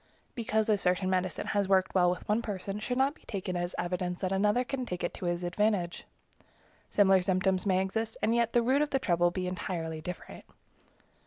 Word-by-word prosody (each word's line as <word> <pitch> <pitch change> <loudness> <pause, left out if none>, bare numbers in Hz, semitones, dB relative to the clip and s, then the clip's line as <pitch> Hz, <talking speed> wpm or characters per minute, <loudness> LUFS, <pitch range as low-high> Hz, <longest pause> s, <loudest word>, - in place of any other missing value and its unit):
Because 220 -3 0
a 210 -2 +3
certain 185 0 +1
medicine 185 -2 -1
has 200 -2 0
worked 190 -1 +2
well 180 -2 +4
with 180 -1 -4
one 210 +2 +2
person 200 -2 -4
should 245 +3 -2
not 270 +2 +3
be - - -24
taken 190 -3 -3
as 175 0 -2
evidence 180 0 -2
that 185 -1 -1
another 210 +5 +2
can 255 0 -3
take 180 -7 -5
it 175 - -1
to - - -6
his 175 0 -1
advantage. 180 -1 0 0.8
Similar 195 -2 +4
symptoms 185 +1 +1
may 190 -1 +3
exist, 225 +3 -3
and 225 - +1
yet 235 -1 +1
the 240 - +4
root 265 +4 +3
of 300 - +1
the 270 - +1
trouble 175 -8 +2
be 185 +1 -3
entirely 170 -3 -4
different. 180 +2 -8
190 Hz, 200 wpm, -30 LUFS, 180-220 Hz, 0.8 s, well